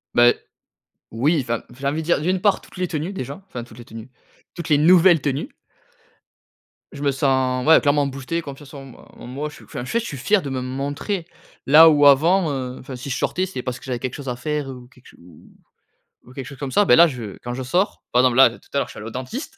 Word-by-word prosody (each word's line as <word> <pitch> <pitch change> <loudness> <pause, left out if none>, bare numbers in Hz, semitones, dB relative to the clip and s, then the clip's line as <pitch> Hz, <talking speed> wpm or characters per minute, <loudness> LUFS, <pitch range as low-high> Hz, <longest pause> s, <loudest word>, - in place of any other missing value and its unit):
Beh, 120 0 +6 0.8
oui, 145 +9 +1
enfin, 115 -2 -3 0.2
j'ai 140 - -2
envie 150 +3 -1
de 160 - -8
dire, 175 - +1
d'une 185 +3 0
part 205 -1 +2
toutes - - -16
les 180 -1 -1
tenues, 160 +3 -4
déjà, 140 +1 -6
enfin, 125 -10 -7
toutes 115 -1 -15
les 120 - -11
tenues, 115 +2 -11 0.4
toutes 170 -2 -7
les 150 - +5
nouvelles 170 +1 +5
tenues. 140 0 -2 1.4
Je 140 - -8
me 140 - +2
sens, 130 -2 0
ouais, 160 - +8
clairement 145 -1 +2
boosté, 140 +5 -4
confiance 140 -2 -11
en 140 -1 -9
moi 135 -2 -15
en - - -11
moi, 140 +4 -4
je - - -15
suis - - -15
enfin, - - -7
en - - -8
fait, 230 - 0
je 230 - -6
suis 140 - -6
fier 190 +11 +2
de 140 - -6
me 130 - -3
montrer, 140 +8 -4 0.4
là, 155 +4 +9
où 145 -2 +6
avant, 165 +5 +4
heu, 130 -2 -4
enfin, 130 0 -9
si 130 +2 -7
je - - -1
sortais 185 - -1
c'est 190 -9 -6
parce 125 -1 -4
que - - -14
j'avais 125 -2 -3
quelque 130 -1 -4
chose 140 -2 -9
à 125 - -2
faire 150 +2 -3
ou 125 -2 -10
quelque 130 0 -23
ch - - -19 1.1
ou 125 - -16
quelque 135 -1 -7
chose 140 -3 -11
comme 140 -2 -4
ça. 205 +6 +3
Beh - - +6
là, 170 +1 +7
je 120 -9 -7
quand 120 0 -4
je 130 - -5
sors, 180 +10 -1
par 125 - +4
exemple 125 -1 +2
là, 135 -2 +8
tout - - -12 0.2
à - - 0
l'heure, 140 - +1
je - - -11
suis - - -11
allé 110 - -8
au - - -5
dentiste, 225 - -7
140 Hz, 260 wpm, -21 LUFS, 125-160 Hz, 1.4 s, là